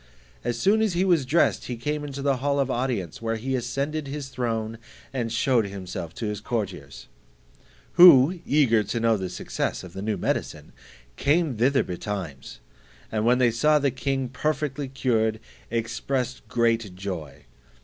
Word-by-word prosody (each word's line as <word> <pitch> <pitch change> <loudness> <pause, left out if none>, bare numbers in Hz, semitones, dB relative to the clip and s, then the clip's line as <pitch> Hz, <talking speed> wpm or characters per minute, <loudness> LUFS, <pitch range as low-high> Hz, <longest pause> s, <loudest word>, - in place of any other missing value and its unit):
As 120 - -1
soon 205 - +3
as 215 -4 +1
he 180 +2 +1
was 165 -8 +2
dressed, 165 +6 +2
he 125 - -4
came 150 +5 -2
into 140 -1 -6
the 140 -2 +2
hall 140 +2 0
of 135 -1 +1
audience, 120 - -2
where 115 0 -1
he 130 +4 -3
ascended 140 +5 -2
his 140 -1 -5
throne, 115 -3 -3 0.3
and 120 -4 -2
shewed 120 -2 +2
himself 95 -3 -6
to 115 - -4
his 105 -1 -3
courtiers: 95 - -4 0.8
who, 175 -1 +8
eager 130 -7 +3
to 105 +3 -3
know 115 -1 +3
the 95 -3 -3
success - - -3
of 90 -2 -11
the 95 - -6
new 105 +1 -1
medicine, - - -3 0.5
came 150 -1 +2
thither 130 +5 +3
betimes, 90 -6 -6 0.5
and 110 0 0
when 125 +1 +5
they 125 -2 +3
saw 150 +7 +3
the 140 -2 +1
king 135 +1 -2
perfectly 145 +1 -2
cured, 115 -4 0 0.3
expressed 120 +3 -2
great 115 -5 0
joy. 90 -6 -6
125 Hz, 160 wpm, -25 LUFS, 110-140 Hz, 0.8 s, who